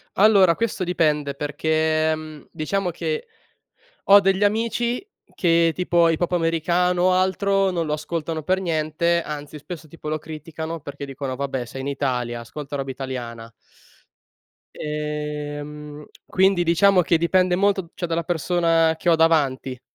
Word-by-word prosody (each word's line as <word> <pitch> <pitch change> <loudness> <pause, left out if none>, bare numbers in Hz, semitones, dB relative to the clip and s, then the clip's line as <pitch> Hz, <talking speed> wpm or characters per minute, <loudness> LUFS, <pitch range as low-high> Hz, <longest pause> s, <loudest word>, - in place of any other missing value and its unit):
Allora, 195 -4 +5
questo 225 -4 -2
dipende 150 -5 0
perché, 155 +2 +1
mhmm, 155 -2 -8
diciamo 185 +4 -2
che 465 - -3 0.8
ho 200 +1 +8
degli 195 +1 +2
amici 235 - 0 0.3
che, 165 -1 +3
tipo, 175 -2 +3
hip 160 - 0
hop 175 - -1
americano 175 +1 +1
o 185 0 +4
altro 195 +1 +2
non 170 -3 -1
lo 150 - -1
ascoltano 160 +1 -3
per 185 +5 0
niente, 170 0 0
anzi 150 0 -7
spesso 160 0 -9
tipo 155 0 -8
lo 155 - 0
criticano 160 +1 -7
perché 145 -1 -7
dicono: 135 -1 -5
"Vabbè, 135 -2 -3
sei 135 +3 -7
in 135 - -5
Italia, 125 -4 -2
ascolta 140 +5 -7
roba 135 -1 -3
italiana." 120 -4 -6 1.2
Ehm, 150 0 -5 0.2
quindi, 190 -1 +3
diciamo 180 +3 +4
che 170 0 +2
dipende 180 +2 +2
molto 200 0 +2
d 170 - -15
cioè, 175 - -4
dalla 165 0 -1
persona 165 -1 +2
che 175 - 0
ho 165 - +6
davanti. 140 -6 +1
160 Hz, 145 wpm, -23 LUFS, 150-180 Hz, 1.2 s, ho